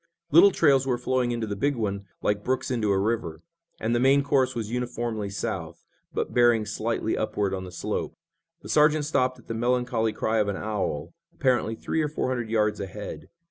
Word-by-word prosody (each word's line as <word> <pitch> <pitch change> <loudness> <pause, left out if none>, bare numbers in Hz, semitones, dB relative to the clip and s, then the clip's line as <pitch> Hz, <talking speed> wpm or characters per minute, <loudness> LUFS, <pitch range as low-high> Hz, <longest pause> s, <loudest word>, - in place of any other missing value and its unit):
Little 175 +6 +8
trails 140 -7 +3
were 125 -2 +1
flowing 125 0 0
into 115 -1 -2
the 105 -1 -4
big 140 +8 0
one 100 -3 -3 0.2
like 105 0 0
brooks 130 +1 -1
into 115 -4 0
a 100 - +3
river, 100 -5 -1 0.4
and 115 +2 0
the 120 - +2
main 135 +2 +4
course 135 -3 +2
was 110 -2 -4
uniformly 120 -4 -2
south, 85 -4 -5 0.3
but - - -3
bearing 120 -3 +4
slightly 110 +1 -1
upward 105 -2 -1
on 95 -1 -4
the 90 - -9
slope. 90 - -3 0.5
The - - -9
sergeant 150 0 +4
stopped 130 -4 +1
at 120 - -19
the - - -3
melancholy 120 -1 +1
cry 110 +1 0
of 105 - +2
an 100 -2 -2
owl, 105 -9 -3 0.2
apparently 125 -4 +1
three 160 - -2
or 150 - 0
four 145 - -2
hundred 120 -3 -2
yards 105 -2 +1
ahead. 100 +1 -7
115 Hz, 195 wpm, -26 LUFS, 105-130 Hz, 0.5 s, Little